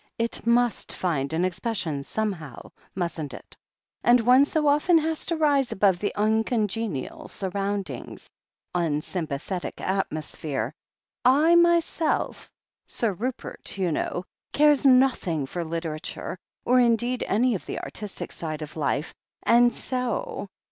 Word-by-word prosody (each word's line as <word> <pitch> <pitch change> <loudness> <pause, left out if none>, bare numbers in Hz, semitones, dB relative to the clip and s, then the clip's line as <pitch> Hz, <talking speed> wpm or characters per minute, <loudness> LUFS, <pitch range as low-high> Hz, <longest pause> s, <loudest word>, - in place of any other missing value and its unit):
It 230 0 -2
must 240 -1 +2
find 150 -6 -1
expression 175 -2 -1
somehow, 175 - -4 0.2
mustn't 165 -6 -3
it - - -13 0.2
— - - -52
and 240 +1 +6
one 250 +4 +6
so 305 +1 0
often 300 +4 +4
has 320 0 -1
to 335 - 0
rise 285 -4 +2
above 190 -1 +2
uncongenial 220 - -1
surrotmdings 200 +1 -4 0.3
— - - -62
^unsympathetic 165 +1 -2
atmo 190 -5 -2
sphere.... 150 -3 -4 0.5
I 295 +6 +5
myself... 340 -1 +2 0.4
Sir 225 -4 0
Rupert, 235 0 -4
you 185 -3 +1
know 175 +3 -2 0.2
— - - -54
cares 295 -1 +5
nothing 250 - +3
for 175 +6 -4
literature, 165 0 -4 0.3
or 250 +1 +5
indeed 240 +1 +2
any 240 +4 +2
of 190 - -5
the - - -3
artistic 210 -2 -6
side 155 -2 -4
of 150 - -9
life, 150 0 -1 0.3
and 240 +1 +5
so 250 -6 -3
210 Hz, 125 wpm, -26 LUFS, 170-250 Hz, 0.5 s, and